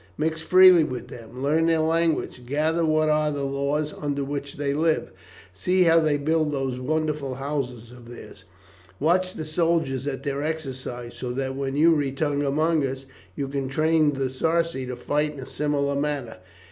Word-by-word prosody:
Mix 160 Hz, +1 st, -1 dB
freely 185 Hz, -1 st, +7 dB
with 130 Hz, -5 st, -5 dB
them, 120 Hz, +3 st, -9 dB
learn 160 Hz, +3 st, +2 dB
their 165 Hz, -1 st, +3 dB
language, 160 Hz, -5 st, 0 dB
gather 155 Hz, +5 st, +1 dB
what 155 Hz, -1 st, +2 dB
are 150 Hz, 0 st, +2 dB
the 145 Hz, -1 st, -3 dB
laws 140 Hz, +2 st, -1 dB
under 145 Hz, -1 st, -1 dB
which 140 Hz, 0 st, -5 dB
they 140 Hz, -1 st, -1 dB
live, 160 Hz, +2 st, 0 dB, 0.4 s
see 180 Hz, -, +1 dB
how 165 Hz, -1 st, +5 dB
they 155 Hz, -2 st, +2 dB
build 155 Hz, +1 st, +1 dB
those 135 Hz, -3 st, -2 dB
wonderful 150 Hz, -1 st, -2 dB
houses 125 Hz, -4 st, -4 dB
of 120 Hz, -1 st, -13 dB
theirs, 120 Hz, -5 st, -12 dB, 0.6 s
watch 185 Hz, +4 st, +1 dB
the 155 Hz, -, -5 dB
soldiers 155 Hz, -4 st, 0 dB
at 135 Hz, -2 st, -4 dB
their 140 Hz, 0 st, -2 dB
exercises, 130 Hz, -6 st, -5 dB
so 125 Hz, -, -4 dB
that 135 Hz, +1 st, -3 dB
when 135 Hz, 0 st, -3 dB
you 165 Hz, +3 st, +5 dB
return 145 Hz, 0 st, 0 dB
among 155 Hz, +2 st, +1 dB
us 135 Hz, 0 st, -3 dB, 0.3 s
you 140 Hz, -, -3 dB
can 135 Hz, -1 st, -3 dB
train 155 Hz, +1 st, +2 dB
the 135 Hz, -1 st, -2 dB
Sarci 160 Hz, -1 st, 0 dB
to 125 Hz, -, -4 dB
fight 150 Hz, +4 st, -1 dB
in -, -, -9 dB
a -, -, -7 dB
similar 145 Hz, -1 st, -1 dB
manner. 140 Hz, -4 st, -2 dB
145 Hz, 175 wpm, -25 LUFS, 135-160 Hz, 0.6 s, freely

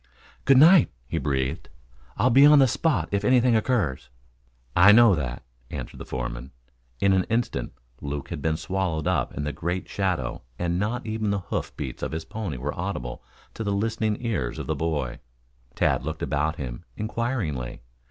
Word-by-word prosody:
"Good 135 Hz, -, +6 dB
night," 165 Hz, +4 st, +7 dB, 0.2 s
he -, -, -2 dB
breathed. 65 Hz, -2 st, -2 dB, 0.5 s
"I'll 125 Hz, -, +3 dB
be 135 Hz, +4 st, +7 dB
on 150 Hz, +1 st, +8 dB
the 135 Hz, -, +7 dB
spot 110 Hz, -, 0 dB
if 100 Hz, 0 st, 0 dB
anything 125 Hz, +1 st, +4 dB
occurs." 105 Hz, -, 0 dB, 0.7 s
"I 90 Hz, +4 st, +8 dB
know 115 Hz, -1 st, +7 dB
that," 65 Hz, -7 st, -3 dB, 0.3 s
answered -, -, -6 dB
the -, -, -8 dB
foreman. -, -, -4 dB, 0.5 s
In 100 Hz, -1 st, +3 dB
an 95 Hz, -1 st, +2 dB
instant 115 Hz, +1 st, -2 dB, 0.3 s
Luke 70 Hz, 0 st, -5 dB
had -, -, -5 dB
been 80 Hz, -1 st, 0 dB
swallowed 90 Hz, -4 st, -2 dB
up 75 Hz, -9 st, 0 dB
in 75 Hz, -, -2 dB
the 75 Hz, -, -3 dB
great 90 Hz, +2 st, -3 dB
shadow 90 Hz, -11 st, -2 dB, 0.2 s
and 85 Hz, 0 st, -1 dB
not 115 Hz, +5 st, -2 dB
even 110 Hz, -1 st, -2 dB
the 100 Hz, -, +1 dB
hoof -, -, -3 dB
beats 70 Hz, -4 st, -5 dB
of -, -, -3 dB
his 80 Hz, 0 st, -4 dB
pony 100 Hz, -11 st, -5 dB
were 70 Hz, +4 st, -3 dB
audible 85 Hz, -9 st, -4 dB, 0.3 s
to 115 Hz, -, -5 dB
the 100 Hz, -, -1 dB
listening 110 Hz, +1 st, 0 dB
ears 70 Hz, -, -2 dB
of -, -, -5 dB
the -, -, -1 dB
boy. 75 Hz, -6 st, -2 dB, 0.6 s
Tad -, -, +1 dB
looked -, -, -4 dB
about 75 Hz, +3 st, 0 dB
him 60 Hz, -5 st, -6 dB
inquiringly. 105 Hz, -, -3 dB
90 Hz, 175 wpm, -25 LUFS, 70-110 Hz, 0.7 s, on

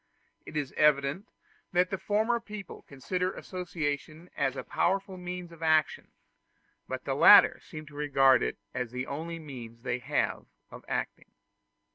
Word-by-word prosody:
It 155 Hz, -, -5 dB
is 145 Hz, -3 st, -3 dB
evident 150 Hz, -, +2 dB, 0.5 s
that 180 Hz, +1 st, +2 dB
the 195 Hz, -, -2 dB
former 220 Hz, +3 st, +1 dB
people 210 Hz, -4 st, -9 dB
consider 180 Hz, +7 st, -2 dB
association 160 Hz, -2 st, -5 dB
as 135 Hz, -1 st, 0 dB
a -, -, -5 dB
powerful 195 Hz, 0 st, 0 dB
means 180 Hz, -1 st, -6 dB
of 165 Hz, -1 st, -14 dB
action, 155 Hz, -1 st, +2 dB, 0.8 s
but -, -, -5 dB
the -, -, -1 dB
latter -, -, +8 dB
seem 155 Hz, 0 st, -10 dB
to 145 Hz, -, -15 dB
regard 135 Hz, -3 st, +4 dB
it -, -, -2 dB, 0.2 s
as 125 Hz, -1 st, -3 dB
the 125 Hz, +2 st, -4 dB
only 165 Hz, +5 st, -5 dB
means 120 Hz, -7 st, -10 dB
they 125 Hz, -1 st, -2 dB
have 125 Hz, -, -1 dB, 0.2 s
of -, -, -11 dB
acting. -, -, -4 dB
155 Hz, 150 wpm, -29 LUFS, 140-180 Hz, 0.8 s, latter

